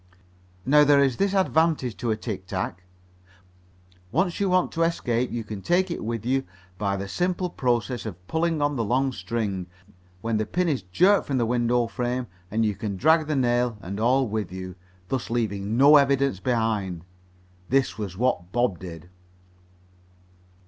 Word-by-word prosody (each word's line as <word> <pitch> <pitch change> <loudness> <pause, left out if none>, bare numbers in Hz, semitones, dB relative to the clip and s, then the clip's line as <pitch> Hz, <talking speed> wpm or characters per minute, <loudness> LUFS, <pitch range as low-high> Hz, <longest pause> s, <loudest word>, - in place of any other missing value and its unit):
Now 150 +2 +6
there 145 -1 +5
is 135 -3 +2
this 200 0 +1
advantage 160 - +2
to 120 - -3
a 110 - +1
tic 100 -5 -6
tac. 95 -1 -3 1.3
Once 175 - 0
you 200 -1 +1
want 185 0 +2
to 165 - -3
escape 125 -7 0
you 120 -1 -3
can 105 -2 -7
take 180 - +1
it - - -4
with 115 0 -3
you 135 +2 +1 0.4
by 100 -2 0
the 100 0 -4
simple 180 - -1
process 120 -3 -1
of 90 -3 -9
pulling 160 -2 0
on 145 0 +1
the 115 - 0
long 130 +5 +1
string, 100 -3 -3 0.5
when 115 -1 0
the 110 0 -1
pin 180 0 0
is 145 -8 0
jerked 180 - +3
from 135 - 0
the 120 - +2
window 120 0 +1
frame, 125 +1 -2 0.2
and 110 +2 +1
you 105 - +1
can 100 -1 -4
drag 160 - +4
the 155 - 0
nail 120 -3 +1
and 100 +2 -6
all 130 +3 +3
with 105 -3 -3
you, 95 0 -6 0.4
thus 130 -2 -2
leaving 110 -2 -1
no 145 +3 +8
evidence 140 -6 +2
behind. 105 -7 -1 0.6
This 135 -3 +1
was 95 -4 -5
what 95 -7 0
Bob 120 -6 0
did. 85 -2 -9
120 Hz, 170 wpm, -25 LUFS, 105-140 Hz, 1.3 s, no